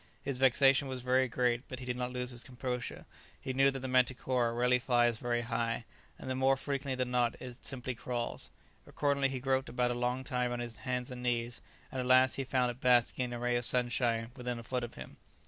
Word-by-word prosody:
His 135 -2 -3
vexation 135 +2 +5
was 130 -1 -4
very 130 +1 +3
great, 120 +1 0
but 130 - -6
he 125 - -8
did 125 -1 -2
not 125 0 -3
lose 125 0 -3
his 120 -1 -4
composure; 125 -1 -4 0.3
he 130 - -4
knew 135 +1 +5
that 135 -1 -4
the 130 - -3
manticora 125 -1 +2
rarely 125 +1 +3
flies 120 -2 +2
very 120 -1 0
high, 115 -1 -2 0.3
and - - -9
that 130 - -1
more 135 +1 +3
frequently 140 -1 -2
than 125 -1 -2
not 120 -1 +1
it 125 -1 -9
simply 130 -2 -4
crawls. 120 -1 -4 0.4
Accordingly 140 -2 +1
he 130 -1 -3
groped 130 +1 0
about 125 0 +1
a - - 0
long 125 +2 -1
time 125 -1 -1
on 120 - -2
his 120 -1 -5
hands 125 0 -3
and 125 -1 -7
knees, 120 -1 -1 0.3
and 130 - -2
at 125 - -3
last 130 -1 +6
he 135 - -2
found 125 -1 +1
it 120 - -13
basking 125 0 +3
in 120 - -5
a - - -3
ray 120 +1 0
of 120 - -2
sunshine 120 -1 0
within 125 -2 -3
a 115 - -7
foot 125 +1 -2
of 120 - -6
him. - - -10
125 Hz, 230 wpm, -32 LUFS, 120-130 Hz, 0.4 s, last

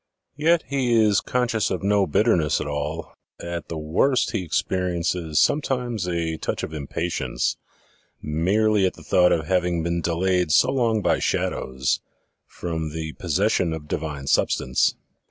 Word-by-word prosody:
Yet 160 +3 +3
he 130 -3 0
is 110 -3 +4
conscious 120 -4 0
of 95 0 -3
no 100 -1 +2
bitterness 85 -2 +2
at - - -3
all 75 +2 -4 0.3
at 85 0 -5
the 85 - -4
worst 90 - +1
he 110 - -1
experiences 85 -2 -1
sometimes 125 -9 0
a 85 -2 -1
touch - - -3
of - - -5
impatience 80 +3 -2 0.6
merely 95 +6 +2
at - - -4
the - - -14
thought 90 -1 +4
of 80 -2 +1
having 90 -1 0
been 85 0 -1
delayed 90 0 +1
so 75 - +5
PREFACE - - 0
ix 135 - 0
long 115 -3 +2
by - - +2
shadows 65 -1 -1 0.5
from 80 -3 -4
the 80 -1 -4
possession 90 0 +1
of 75 -2 -7
divine 75 -3 -4
substance. 65 -1 +2
90 Hz, 155 wpm, -23 LUFS, 80-110 Hz, 0.6 s, so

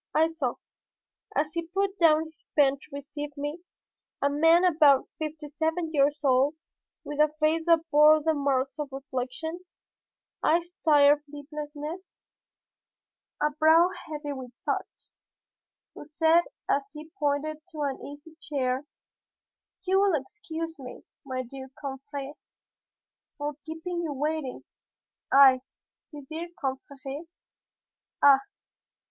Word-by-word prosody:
I 315 - +5
saw, 325 0 -2 0.8
as 300 +1 0
he 335 -1 -3
put 390 +3 -1
down 320 -2 +5
his 315 -1 -17
pen 280 -2 +4
to - - -16
receive 285 +1 -7
me, 290 +4 -4 0.6
a 280 - +1
man 325 +4 +5
about 300 -6 +5
fifty 310 -1 -5
seven 320 +2 -2
years 290 0 +2
old, 270 +2 +3 0.5
with 295 0 -6
a 305 0 +5
face 320 +2 +1
that 330 -1 +4
bore 300 +1 +7
the 320 0 +2
marks 280 0 0
of 290 -2 -4
reflection, 270 +5 -4 0.8
eyes 345 +3 +1
tired 290 -2 +6
from 290 0 -11
sleeplessness, 300 +4 -7 1.2
a 300 - +3
brow 320 +4 +5 0.2
heavy 295 -2 -5
with 260 -2 -7 0.2
thought, - - -4 0.8
who - - -10
said 320 +3 +3 0.2
as 275 0 0
he 310 +1 -10
pointed 300 +1 -1
to 315 -5 -7
an 280 -2 -2
easy 290 +3 -11
chair, 265 -1 -2 1.0
"You 380 0 +3
will 390 -7 +3
excuse 325 +1 -7
me, 255 -2 -9 0.2
my 255 -1 -3
dear 265 +2 -9
confrère, 280 0 -6 1.0
for 295 +1 -3
keeping 345 +2 -4
you 320 -4 -3
waiting." 295 -1 -3 0.7
I, 265 -2 +7 0.5
his 290 -3 -10
dear 325 +3 -5
confrère! 275 +2 -5 1.0
Ah! 275 -1 +8
300 Hz, 125 wpm, -27 LUFS, 280-320 Hz, 1.2 s, Ah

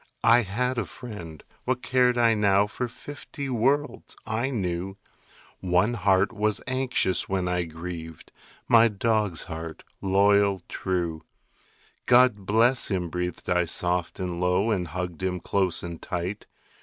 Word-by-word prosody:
I 115 +1 +6
had 120 +5 -1
a 110 - -2
friend; 90 - -9 0.2
what 125 0 -1
cared 125 -1 +3
I 115 -1 +4
now 100 -2 +3
For 120 +4 -4
fifty 140 +2 -8
worlds? 135 +5 0
I 110 +4 -1
knew 95 -5 -3 0.6
One 90 +5 +2
heart 100 0 +2
was 105 -1 0
anxious 130 -7 +1
when 95 -2 0
I 90 -1 0
grieved 80 -1 -8 0.4
My 115 0 +7
dog's 105 -4 0
heart, 80 0 -7 0.2
loyal, 100 -1 +3
true. 85 -4 -2 0.9
"God 120 -6 +4
bless 120 +4 +3
him," 90 -4 -2
breathed 90 0 -4
I 90 0 +2
soft 90 0 -1
and 90 -2 -3
low, 90 +5 +2
And 90 -5 0
hugged 90 +1 -5
him 90 -1 -1
close 95 -1 0
and 85 -1 -7
tight. 90 +4 -4
100 Hz, 140 wpm, -26 LUFS, 90-115 Hz, 0.9 s, My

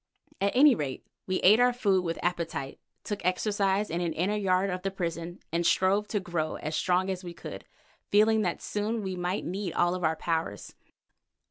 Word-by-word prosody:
At 200 +3 +1
any 285 +2 +7
rate 140 - -4 0.2
we 185 -1 0
ate 210 +5 +6
our 245 0 +4
food 200 -6 +2
with 165 -1 -2
appetite, 170 -6 -2 0.2
took 205 -3 -4
exercise 195 +2 +1
in 170 +2 -1
an 170 -2 -1
inner 190 +6 0
yard 195 -1 +1
of 180 0 -3
the 195 - -1
prison, 175 -2 -4
and 170 +1 0
strove 195 +4 +2
to 205 - -1
grow 170 -4 -2
as 155 +1 -4
strong 185 +3 +1
as 185 0 -5
we 175 -1 -8
could, - - -8 0.4
feeling 220 +2 +4
that 180 -4 -2
soon 215 +2 -2
we 190 -1 -3
might 180 +2 -2
need 190 0 -3
all 175 0 +2
our 160 0 +2
powers. 160 - -3
185 Hz, 190 wpm, -28 LUFS, 170-205 Hz, 0.4 s, any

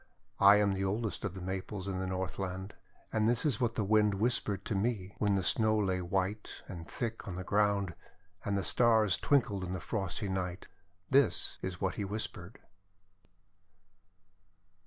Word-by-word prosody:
• - - -27 0.4
••••••• - - +10
I - - +8
am 105 -1 +3
the 95 0 -2
oldest 100 -1 -2
of 95 -2 -4
the 95 - -6
Maples 95 +1 -4
in 95 -1 -2
the 95 - -2
North 95 -2 -3
land, 95 +1 -4 0.4
and 110 0 +3
this 120 +3 +1
is 140 -3 +1
what 115 -2 +1
the 110 - 0
Wind 105 0 +3
whispered 105 -2 0
to - - -1
me 100 -2 -1
when 105 -2 +2
the 95 - 0
Snow 110 +3 +3
lay 95 -3 +1
white 95 +4 -2
and 85 -4 -8
thick 115 +3 -4
on 95 - -4
the 95 - -4
ground, 100 -2 +1 0.5
and 100 -1 0
the 100 - -1
Stars 110 -1 +4
twinkled 110 -9 +1
in 90 0 -3
the 95 - -3
frosty 100 +1 -3
night. 95 -1 -3 0.4
This 140 0 +2
is 90 -1 -4
what 95 -2 -1
he 105 - -1
whispered. 100 -2 -5
100 Hz, 180 wpm, -32 LUFS, 95-110 Hz, 0.5 s, •••••••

